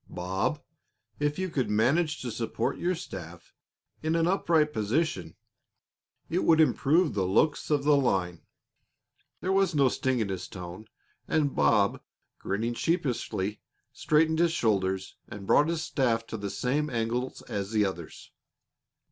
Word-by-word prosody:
Bob, 95 - -2 0.6
if 145 0 0
you 185 0 -1
could 130 - -1
manage 140 +10 +1
to 120 - -3
support 110 0 -2
your 180 +1 0
staff 85 - -9 0.5
in 160 +1 0
an 165 -1 +2
upright 165 -4 +2
position, 125 +10 -1 0.9
it 175 - 0
would 160 -1 +4
improve 160 +2 +3
the 100 - -1
looks 145 +11 +1
of 145 -2 +2
the 150 0 +5
line." 95 - 0 1.0
There 185 - -1
was 190 -3 +2
no 140 -3 +4
sting 130 +1 0
in 110 -3 -1
his 95 -2 -4
tone, 90 +3 -9 0.4
and 145 -3 +1
Bob, 100 -3 +3 0.4
grinning 110 +5 -2
sheepishly, 120 - -1 0.3
straightened 160 +1 +2
his 170 -1 +3
shoulders 95 - 0
and 100 -1 -9
brought 145 +9 +4
his 165 -1 -1
staff 115 -8 0
to 110 - -6
the 100 -1 -4
same 140 +9 -1
angle 120 +1 -2
as 100 -4 -3
the 105 -2 +2
others. 85 -4 -7
125 Hz, 145 wpm, -28 LUFS, 100-155 Hz, 1.0 s, the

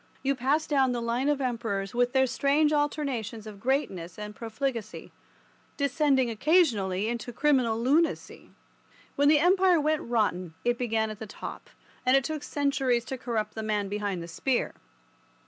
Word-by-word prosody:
You 275 0 +2
pass 275 +5 +1
down 265 -4 +2
the 240 - -2
line 235 +4 0
of 295 - +2
the 270 - -2
Emperors 225 -6 -3
with 245 0 +2
their 265 0 +3
strange 290 +4 +2
alternations 275 -7 -2
of 210 -2 -9
greatness 195 - -2
and 210 0 -7
profligacy, 230 -1 -4 0.7
descending 280 -2 +2
occasionally 225 - +2
to 235 +1 -7
criminal 250 -4 +2
lunacy. 295 +8 0 0.7
When 285 0 +3
the 300 +1 +6
Empire 365 +2 +4
went 305 +1 +1
rotten 185 -8 -1
it 240 0 +1
began 220 -3 0
at 215 - -9
the 220 - -7
top, - - -8 0.3
and 255 +1 +5
it 270 - +1
took 310 +2 -3
centuries 270 -5 0
to 265 - -5
corrupt 220 -4 -2
the 220 - -5
man 210 -2 -1
behind 200 -4 -3
the - - -8
spear. 245 +9 -1
245 Hz, 165 wpm, -28 LUFS, 220-280 Hz, 0.7 s, the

